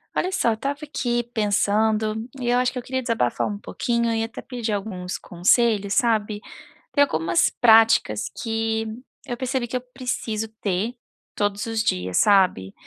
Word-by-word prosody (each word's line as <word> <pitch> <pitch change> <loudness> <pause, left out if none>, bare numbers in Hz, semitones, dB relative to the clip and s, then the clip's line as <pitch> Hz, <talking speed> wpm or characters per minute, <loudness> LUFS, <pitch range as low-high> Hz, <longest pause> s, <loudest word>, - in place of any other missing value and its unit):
Olha 370 - 0
só, 240 - +1
eu - - +2
estava 280 +5 -3
aqui 240 -5 -1
pensando, 215 0 +1 0.3
e 240 - -1
eu 245 - +3
acho 250 0 +2
que 255 - -3
eu - - -5
queria 260 +1 -2
desabafar 230 - 0
um 205 -1 -4
pouquinho 235 +1 -1
e 225 0 0
até 225 +1 -6
pedir 245 -3 -4
alguns 190 -3 -4
conselhos, 200 +3 +2
sabe. 215 -3 +1 0.5
Tem 285 - +5
algumas 165 - +2
práticas 225 - +4 0.2
que 225 -1 -1 0.4
eu 240 - -3
percebi 260 -1 -2
que 255 - -2
eu - - -5
preciso 235 -4 -3
ter, 205 +5 -1 0.4
todos 205 0 -1
os 225 -1 -1
dias, 90 - -1
sabe. 185 - +3
225 Hz, 165 wpm, -23 LUFS, 205-240 Hz, 0.5 s, Tem